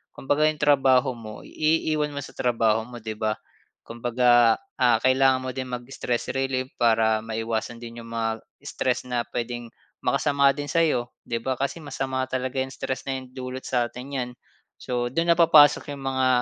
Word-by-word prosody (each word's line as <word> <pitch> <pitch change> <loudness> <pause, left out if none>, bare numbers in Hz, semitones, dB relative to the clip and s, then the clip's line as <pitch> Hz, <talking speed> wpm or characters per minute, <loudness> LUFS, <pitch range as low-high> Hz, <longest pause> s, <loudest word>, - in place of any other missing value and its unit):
kumbaga 145 +3 0
'yong 155 -1 -1
trabaho 135 -2 +4
mo 110 -2 -10
iiwan 155 -1 0
mo - - -2
sa - - -10
trabaho 115 -3 +1
mo, 120 -1 -9
'di 110 -1 -4
ba. 110 -1 +1 0.5
Kumbaga, 120 0 +3 0.2
ah, 120 -3 +4
kailangan 130 +1 +4
mo - - -2
din 130 -1 -4
mag-stress 125 -1 -3
relief 130 -1 -1
para 110 -1 +2
maiwasan 115 +1 -3
din 115 0 -9
'yong - - -12
mga 115 -1 -2 0.2
stress - - -1
na 120 -1 -1
puwedeng 120 -1 -5 0.3
makasama 140 -1 +3
din 145 +1 -5
sa'yo 155 -8 +1 0.2
'di 115 -1 -3
ba? 130 +3 -2
Kasi 140 +6 -3
masama 130 -3 -3
talaga 130 0 -2
'yong 130 +1 -2
stress 130 0 -4
na 135 - -1
'yon 130 -1 -13
dulot 130 0 -6
sa'tin 125 +2 -2
niyan. 125 -3 -2 0.5
So, 120 -1 -2
do'n 165 +7 +1
na 170 - +3
papasok 155 -4 +6
'yong 140 - -10
mga, 130 -1 +1
130 Hz, 170 wpm, -25 LUFS, 120-135 Hz, 0.5 s, papasok